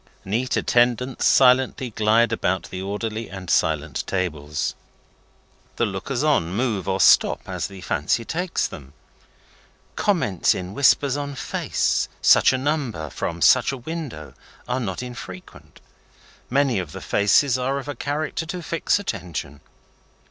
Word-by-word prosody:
Neat 115 +7 -1
attendants 125 +1 +1
silently 130 -1 +4
glide 110 +2 +3
about 95 -4 -1
the 95 - -5
orderly 110 +3 -4
and 95 -2 -6
silent 75 -2 0
tables; 75 -5 -2 1.0
the 120 - +1
lookers 115 +7 -3
on 140 - +2
move 110 -2 -1
or 95 0 0
stop - - +5
as - - -3
the 95 -1 -11
fancy 90 +7 -1
takes 175 +5 -1
them; 70 -2 -9 1.0
comments 160 - +1
in 90 +1 -6
whispers 140 +2 +3
on 145 -1 -4
face - - -1
such - - +6
a 130 - 0
number 130 - -2
from 85 0 -3
such 130 0 +5
a 135 - -5
window 130 - -7 0.3
are 125 +1 -1
not 105 -2 -4
unfrequent; 95 -7 -10 0.7
many 135 -4 +2
of 90 -5 -6
the - - -7
faces 120 +6 +3
are 135 +2 -1
of 140 0 -6
a 145 - -3
character 150 +5 -3
to 175 +1 -5
fix 165 +5 0
attention. 85 - -5
115 Hz, 140 wpm, -23 LUFS, 95-135 Hz, 1.0 s, such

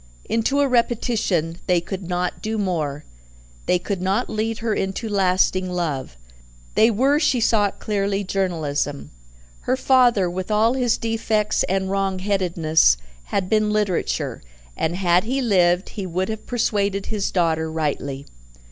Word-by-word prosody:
Into 250 +5 +1
a 285 - +3
repetition 225 -9 0
they 180 -1 +3
could 180 +1 -6
not 180 0 -2
do 220 +1 -2
more; 155 -7 -2 0.6
they 180 - +4
could 185 +1 -4
not 195 +6 0
lead 220 +1 -1
her 230 -2 -1
into 195 +4 -2
lasting 185 -2 +1
love. 150 - -3 0.6
They 225 - +5
were 265 +7 +2
she 300 -5 +2
saw 220 -2 +3
it - - -9
clearly 200 -1 -1
Journalism; 160 - -2 0.6
her 255 - +3
father, 245 -8 +4
with 185 +2 -4
all 215 +3 +3
his 245 -3 +1
defects 220 -2 0
and 190 0 0
wrong 195 -1 0
headedness, 175 - +2 0.3
had 195 -2 -1
been 215 +1 +2
Literature, 210 -4 -1 0.3
and 160 +2 -1
had 180 0 +2
he 260 +4 -1
lived, 185 -6 +2
he 200 -4 -5
would 185 +3 -2
have 220 -1 -6
persuaded 200 -4 0
his 210 -3 -2
daughter 160 -3 0
rightly. 140 -3 -3
195 Hz, 145 wpm, -22 LUFS, 175-220 Hz, 0.6 s, They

